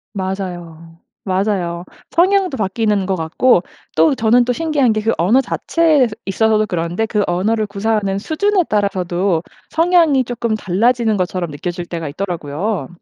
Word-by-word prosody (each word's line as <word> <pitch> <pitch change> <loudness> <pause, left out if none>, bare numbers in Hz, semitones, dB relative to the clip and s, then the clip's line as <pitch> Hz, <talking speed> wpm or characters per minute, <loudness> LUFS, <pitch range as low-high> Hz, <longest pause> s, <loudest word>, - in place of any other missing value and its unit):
맞아요. 175 -4 -6 0.3
맞아요. 185 -3 -1 0.3
성향도 370 -3 +2
바뀌는 210 -1 0
것 190 0 0
같고 175 +5 +2 0.3
또 160 +7 +4
저는 235 +1 +3
또 250 - 0
신기한 295 -4 +1
게 215 - -1
그 225 +2 +1
언어 210 +11 +3
자체에서 295 -3 +1
있어서도 215 +2 +2
그런데 175 +3 -2
그 210 -2 0
언어를 215 +5 0
구사하는 200 -1 -1
수준에 375 - +1
따라서도 190 -4 0 0.3
성향이 330 -5 +3
쪼끔 235 -2 -2
달라지는 220 +3 +1
것처럼 180 -2 -2
느껴질 175 +4 -5
때가 165 -2 -5
있더라고요. 175 +3 -3
205 Hz, 340 characters per minute, -18 LUFS, 180-240 Hz, 0.3 s, 또